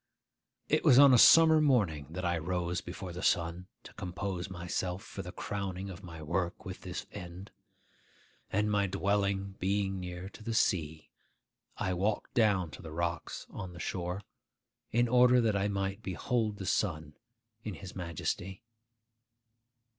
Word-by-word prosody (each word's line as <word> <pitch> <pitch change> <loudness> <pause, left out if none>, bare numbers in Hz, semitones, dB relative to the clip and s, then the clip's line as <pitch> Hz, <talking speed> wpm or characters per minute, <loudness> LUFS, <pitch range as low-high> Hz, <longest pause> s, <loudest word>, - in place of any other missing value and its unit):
It - - +2
was 125 - +7
on 140 -1 +9
a - - +7
summer 160 +2 +8
morning 100 - +2
that 90 +3 -5
I 85 0 +1
rose 90 +1 -2
before 90 0 -7
the 90 - -6
sun 85 -1 0 0.2
to - - -12
compose 90 0 -4
myself 90 +1 -3
for - - -7
the - - -7
crowning 95 -1 -4
of 90 +1 -9
my 80 -3 -9
work 85 +6 -2
with 95 -2 -7
this 90 -2 -5
end; 90 0 -9 1.0
and 105 +2 +1
my 100 -1 +2
dwelling 100 +1 0
being 95 0 0
near 90 0 -6
to - - -14
the 115 +1 -3
sea, 80 -7 0 0.7
I 95 - -1
walked 100 +4 -1
down 100 -8 +2
to - - -10
the 80 -3 -9
rocks 85 +1 -3
on 90 -1 -7
the 85 - -10
shore, 90 +2 -3 0.7
in 120 +2 +2
order 125 +1 +6
that 110 -3 +2
I 100 0 +1
might 100 0 -2
behold 105 +3 -1
the 95 - -6
sun 80 -6 -1 0.5
in 105 -4 -5
his 95 -3 -10
majesty. 90 +3 -4
95 Hz, 155 wpm, -31 LUFS, 90-100 Hz, 1.0 s, on